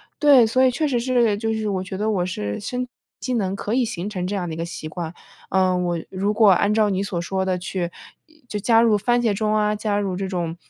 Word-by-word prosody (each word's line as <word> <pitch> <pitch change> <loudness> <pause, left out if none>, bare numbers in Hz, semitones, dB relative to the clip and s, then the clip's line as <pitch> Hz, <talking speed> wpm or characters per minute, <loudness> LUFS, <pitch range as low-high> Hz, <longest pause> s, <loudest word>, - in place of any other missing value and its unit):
实 - - -26
是 - - -38
对， 280 -6 +6
所 255 +4 +2
以 260 - +5
确 300 +5 -1
实 245 -4 0
是 240 -4 +2
就 225 +1 -1
是 220 -1 -2
我 190 -2 -1
觉 190 0 -6
得 215 +3 0
我 180 -4 0
是 105 - -4
身 250 +4 -3
体 - - -38 0.3
机 255 - -3
能 195 -4 0
可 205 - -4
以 255 - +2
形 200 -4 -4
成 180 -3 -3
这 200 +2 -2
样 180 - -2
的 160 - -4
一 - - -8
个 165 - -2
习 170 -2 -7
惯。 165 +1 -6 0.4
呃， 185 -1 +3
我 175 -1 -1
如 200 +2 -1
果 215 -2 +6
按 200 +3 +3
照 215 -2 +3
你 190 0 0
所 195 -3 -3
说 190 +2 -2
的 185 -1 0
去 180 -1 -3 0.6
就 210 - -3
加 225 +2 +4
入 220 -3 +4
番 240 +3 +1
茄 225 -3 +2
钟 215 +1 0
啊， 210 0 +2
加 210 -1 -1
入 195 -2 -1
这 195 +1 -3
种 175 -3 -3
205 Hz, 290 characters per minute, -22 LUFS, 185-225 Hz, 0.6 s, 对